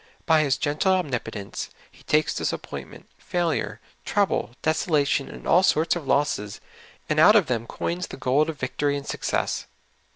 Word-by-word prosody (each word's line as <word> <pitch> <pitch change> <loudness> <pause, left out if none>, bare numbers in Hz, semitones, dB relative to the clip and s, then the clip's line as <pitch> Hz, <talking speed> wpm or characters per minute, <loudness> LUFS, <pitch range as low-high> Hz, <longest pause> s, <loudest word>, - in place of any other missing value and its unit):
By 160 -1 +5
His 140 -4 +1
gentle 155 +6 +1
omnipotence, 125 - -3 0.2
He - - -20
takes 150 0 +2
disappointment, - - -5
failure, 155 - -1 0.2
trouble, 195 - 0
desolation, 150 -3 +1
and - - -10
all 180 - +6
sorts 165 -3 +3
of 165 -5 -6
losses, 105 -9 0 0.5
and 155 0 +1
out 195 +7 +8
of 205 -5 +6
them 115 -3 -2
coins 175 +2 -3
the - - -9
gold 135 +4 +2
of 160 - -5
victory 145 +2 -1
and 140 - -7
success. - - -2
150 Hz, 155 wpm, -25 LUFS, 130-170 Hz, 0.5 s, out